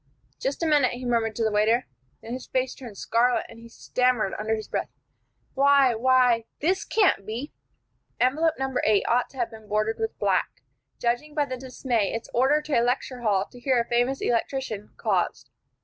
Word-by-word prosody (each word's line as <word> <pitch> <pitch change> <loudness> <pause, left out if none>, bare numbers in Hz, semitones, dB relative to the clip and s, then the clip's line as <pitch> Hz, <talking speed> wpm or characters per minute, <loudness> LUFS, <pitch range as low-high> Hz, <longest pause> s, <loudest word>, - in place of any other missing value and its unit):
"Just 275 +5 -2
a - - +2
minute," 295 -6 +3
he 250 +1 -6
murmured 230 -3 0
to 230 - -1
the 220 - +1
waiter. 220 +4 +2 0.4
Then 230 - -6
his 255 - -6
face 260 0 -1
turned 235 -6 -11
scarlet, 240 +5 +1
and 230 - -13
he 230 0 -13
stammered, 250 -3 0
under 220 +1 0
his 215 - -7
breath, - - -3 0.6
"Why 275 -2 +5
why 245 -1 +3
this 365 +6 +1
can't 400 - +2
be 235 +8 -6 0.3
" - - -46
Envelope 315 +4 0
No. 265 0 -2
8 210 -2 +3
ought 245 +1 +2
to 270 - -16
have 240 -2 -1
been 220 -1 -13
bordered 215 +1 0
with 445 0 -3
black, - - 0 0.3
judging 245 +6 -1
by 295 -2 +2
the 260 -2 -4
dismay 250 -4 -2
its 230 - -6
order 275 +5 +3
to 300 -5 +1
a - - +2
lecture 245 +1 -1
hall 200 -4 +1
to 245 - -13
hear 255 0 +2
a 235 - 0
famous 245 +3 +1
electrician, 230 -3 -2
caused. 175 - -1
245 Hz, 195 wpm, -25 LUFS, 225-265 Hz, 0.6 s, Why